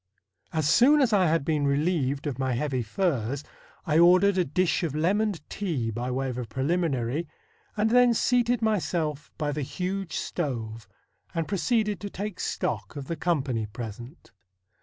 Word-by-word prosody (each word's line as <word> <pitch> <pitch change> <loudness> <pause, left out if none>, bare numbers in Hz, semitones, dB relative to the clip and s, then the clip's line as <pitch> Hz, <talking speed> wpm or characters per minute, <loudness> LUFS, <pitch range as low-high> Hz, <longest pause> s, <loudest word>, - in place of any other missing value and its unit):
As 155 -3 0
soon 270 - +6
as 255 -6 +3
I 190 -3 +4
had 160 -2 +1
been 150 -2 +1
relieved 140 -1 0
of 140 -4 -3
my 130 -1 0
heavy 130 +1 -1
furs, 135 - -1 0.4
I 155 -1 +3
ordered 185 +3 +6
a - - +4
dish 175 +4 +1
of 160 -5 -2
lemoned 190 +2 0
tea 150 - -2
by 120 +3 -3
way 135 +1 -1
of 125 -1 -4
a 125 - -3
preliminary, 135 - -1 0.5
and 215 +1 +2
then 245 -1 +5
seated 245 0 +2
myself 160 -8 -1
by 150 -2 -1
the 150 +1 -3
huge 180 +5 -3
stove 115 - -4 0.5
and 165 -1 -1
proceeded 210 +1 0
to 205 - -5
take 200 -1 -5
stock - - -3
of 140 -2 -5
the 165 - -3
company 135 -9 -1
present. 120 - -9
155 Hz, 160 wpm, -27 LUFS, 130-190 Hz, 0.5 s, soon